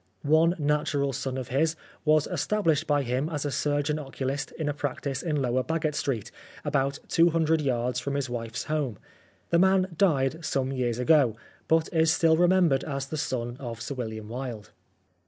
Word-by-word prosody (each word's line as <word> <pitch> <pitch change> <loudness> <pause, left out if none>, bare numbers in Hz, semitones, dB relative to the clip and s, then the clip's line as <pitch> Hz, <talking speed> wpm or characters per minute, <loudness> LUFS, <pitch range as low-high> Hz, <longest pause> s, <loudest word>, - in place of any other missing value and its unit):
One 160 +4 +4
natural 145 -2 0
son 135 0 -3
of 130 -2 -5
his 155 +5 +1 0.3
was 155 -1 +4
established 175 -1 0
by 145 -1 +2
him 130 +5 -1
as 150 -3 -3
a 145 - -1
surgeon 145 +2 0
oculist 135 0 -4
in 155 - -3
a 145 - 0
practice 140 -1 -3
in 155 -4 -1
Lower 130 -1 +1
Baggot 160 0 -1
Street, 135 -7 -2 0.3
about 140 -1 0
two 170 +1 +4
hundred 160 -1 +2
yards 125 -3 0
from 140 0 -3
his 140 -2 -1
wife's 115 -2 -4
home. 145 -8 -2 0.5
The 170 - +4
man 190 0 +3
died 160 -3 +2
some 135 -3 -1
years 120 -3 -1
ago, 125 -3 +4 0.3
but 160 0 +3
is 160 -1 +4
still 160 0 +4
remembered 175 -5 +3
as 140 -2 -3
the 145 - -6
son 120 -4 -3
of 115 -4 -6
Sir 130 - -4
William 110 -4 -5
Wilde. 120 -3 -6
145 Hz, 175 wpm, -27 LUFS, 130-160 Hz, 0.5 s, One